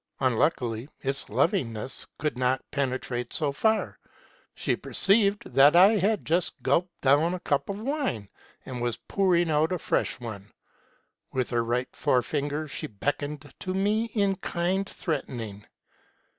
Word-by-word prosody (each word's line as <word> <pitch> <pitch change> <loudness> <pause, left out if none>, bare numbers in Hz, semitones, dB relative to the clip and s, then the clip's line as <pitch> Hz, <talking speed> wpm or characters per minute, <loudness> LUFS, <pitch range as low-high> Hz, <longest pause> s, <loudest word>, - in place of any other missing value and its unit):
Unluckily, 125 -1 0
its 135 0 -3
lovingness 115 0 -1
could 150 -2 -1
not 130 +1 0
penetrate 130 -3 -2
so 150 -2 +2
far. 220 +9 0 0.6
She - - 0
perceived 200 0 +3
that 140 +4 +7
I 185 +3 +9
had 205 +2 +1
just 170 +2 +1
gulped 175 0 0
down 150 +6 +3
a - - -6
cup 140 -2 -1
of 200 0 -3
wine, 260 - -2 0.4
and 125 -2 -5
was 120 -1 -1
pouring 175 +5 +1
out 155 +2 +2
a 180 - 0
fresh - - -1
one. 110 -4 -8 0.8
With 130 -2 -1
her 120 -1 +1
right 120 +2 -2
forefinger 145 +4 0
she - - -5
beckoned 145 +6 -4
to 185 0 -3
me 210 +4 +1
in 200 -4 0
kind 185 +4 -1
threat 155 -6 -3
ening. 105 -5 -7
145 Hz, 145 wpm, -27 LUFS, 125-185 Hz, 0.8 s, I